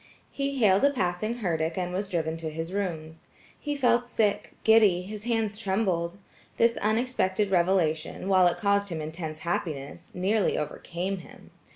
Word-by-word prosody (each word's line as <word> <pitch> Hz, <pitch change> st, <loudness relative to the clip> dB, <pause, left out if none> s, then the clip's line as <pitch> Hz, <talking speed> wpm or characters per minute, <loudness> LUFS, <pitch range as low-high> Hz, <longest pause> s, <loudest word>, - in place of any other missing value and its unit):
He 275 Hz, 0 st, -2 dB
hailed 200 Hz, -4 st, +4 dB
a 280 Hz, -, +6 dB
passing 215 Hz, 0 st, -2 dB
herdic 165 Hz, -2 st, -1 dB
and 180 Hz, -1 st, -2 dB
was 195 Hz, +2 st, -2 dB
driven 160 Hz, -3 st, -1 dB
to 165 Hz, -1 st, -4 dB
his 165 Hz, +3 st, -5 dB
rooms. 165 Hz, -5 st, -4 dB, 0.3 s
He 290 Hz, -1 st, -3 dB
felt 245 Hz, -3 st, +2 dB
sick, 210 Hz, -2 st, 0 dB
giddy, 210 Hz, -5 st, +5 dB
his 210 Hz, +3 st, -7 dB
hands 225 Hz, -3 st, 0 dB
trembled. 190 Hz, -4 st, -1 dB, 0.4 s
This 230 Hz, 0 st, +4 dB
unexpected 215 Hz, -3 st, 0 dB
revelation, 175 Hz, -2 st, +1 dB
while 185 Hz, -2 st, +5 dB
it 175 Hz, -, 0 dB
caused 200 Hz, -1 st, +1 dB
him 165 Hz, -3 st, -4 dB
intense 155 Hz, 0 st, -5 dB
happiness, 170 Hz, -6 st, -4 dB
nearly 195 Hz, +3 st, +1 dB
overcame 180 Hz, +5 st, -3 dB
him. 170 Hz, -, -15 dB
190 Hz, 155 wpm, -27 LUFS, 170-215 Hz, 0.4 s, a